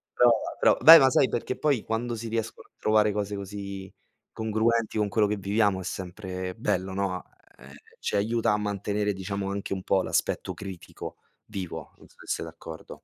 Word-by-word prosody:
Però 120 -1 +6 0.3
però - - +5
beh, 165 0 +12
ma 135 -1 +5
sai, 130 +1 +4
perché 120 +2 -3
poi 140 -7 +1
quando 115 +1 -2
si 115 +1 -6
riescono 115 0 -4
a - - -47
trovare 105 -1 +3
cose 105 0 -2
così 100 -1 -7 0.4
congruenti 110 +1 0
con 105 -1 +2
quello 105 0 +2
che 105 0 -1
viviamo 100 0 +1
è - - -6
sempre 90 0 -5
bello, 95 +1 -1
no? 95 -2 -2 0.3
Ehm, - - -14 0.3
ci - - -2
aiuta 110 +2 +1
a 105 - +2
mantenere 105 0 -1
diciamo 95 +1 -4
anche 100 0 -3
un 95 -1 -5
po' 95 -1 +2
l'aspetto - - -1
critico 95 -4 -8 0.3
vivo, 90 -7 -6
non - - -17
so - - -25
se - - -14
sei - - -2
d'accordo. 80 0 -10
105 Hz, 185 wpm, -27 LUFS, 95-110 Hz, 0.4 s, beh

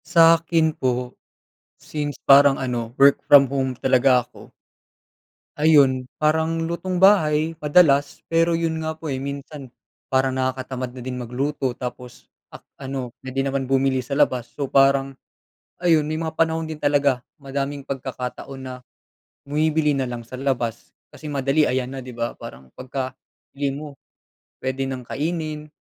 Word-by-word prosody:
Sa'kin 165 -1 +4
po, 125 -2 -2 0.6
since 145 -1 -5
parang 140 0 +7
ano 120 -2 -4
work 140 0 +5
from 145 -1 +9
home 130 -2 -1
talaga 130 -1 +3
ako - - -16 1.1
ayun, 140 -5 +4
parang 160 +2 +1
lutong 170 +3 -3
bahay 165 -4 +3
madalas 145 -2 +3
pero 165 0 +3
yun 165 -1 -1
nga 160 0 -3
po, 160 -2 -6
eh, 130 - -2
minsan 140 0 -7 0.4
parang 130 0 +1
nakakatamad 130 -1 -3
na 125 - -8
din 125 0 -5
magluto 130 +1 -2
tapos 125 -1 -8 0.2
ak - - -12 0.2
ano 130 -2 -5
puwede 130 +1 -3
naman 135 -1 -2
bumili 135 0 +2
sa 130 +2 -4
labas. 130 -5 +1
So 140 -3 -4
parang, 135 0 +3 0.6
ayun 165 -4 +3
may 155 - -2
mga 160 0 -3
panahon 160 0 0
din 155 -1 -7
talaga 140 -3 +2 0.2
madaming 140 0 -4
pagkakataon 130 0 -6
na 130 -1 -7 0.8
bumibili 150 0 +1
nalang 120 -3 -3
sa 130 - -7
labas 125 -4 -3 0.2
kasi - - -16
madali 140 +2 +2
ayan 130 -2 -1
na 135 -1 -7
di 125 - -9
ba, 115 0 -4
parang 65 +1 -11
pagka 130 0 -5 0.4
bili 140 -1 -1
mo 145 0 -8 0.7
puwede 130 +1 -2
nang 130 -1 -5
kainin, 155 +2 -4
140 Hz, 145 wpm, -22 LUFS, 130-155 Hz, 1.1 s, from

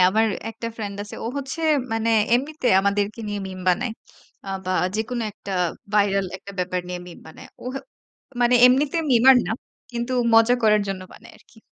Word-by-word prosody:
আমার 220 +2 +3 0.2
একটা 230 - -7
ফ্রেন্ড 205 -3 -5
আছে। 205 - -10
ও - - -2
হচ্ছে 280 +4 -5 0.3
মানে 225 0 0 0.3
এমনিতে 280 +2 -1
আমাদেরকে 200 +2 -1
নিয়ে 205 0 -3
মিম 185 -1 -8
বানায়। 225 +7 +1 0.5
আ 195 - -9 0.2
বা 185 - -1 0.2
যেকোনো 230 +2 -2
একটা 200 -1 -8 0.4
ভাইরাল 200 -2 +2
একটা 200 +1 -11
ব্যাপার 180 0 -1
নিয়ে 180 0 -4
মিম 175 - -11
বানায়। 160 - -12 0.2
ও - - -11
হ্যাঁ - - -6 0.6
মানে 240 +1 +4
এমনিতে 275 +5 +2
মিমার 255 +2 +7
না। - - -1 0.4
কিন্তু 240 +2 -3 0.2
মজা 225 +2 +6
করার 215 -1 +4
জন্য 195 -1 -3
বানায় 230 +1 -15
আরকি। 225 - -23
220 Hz, 175 wpm, -23 LUFS, 195-245 Hz, 0.6 s, মিমার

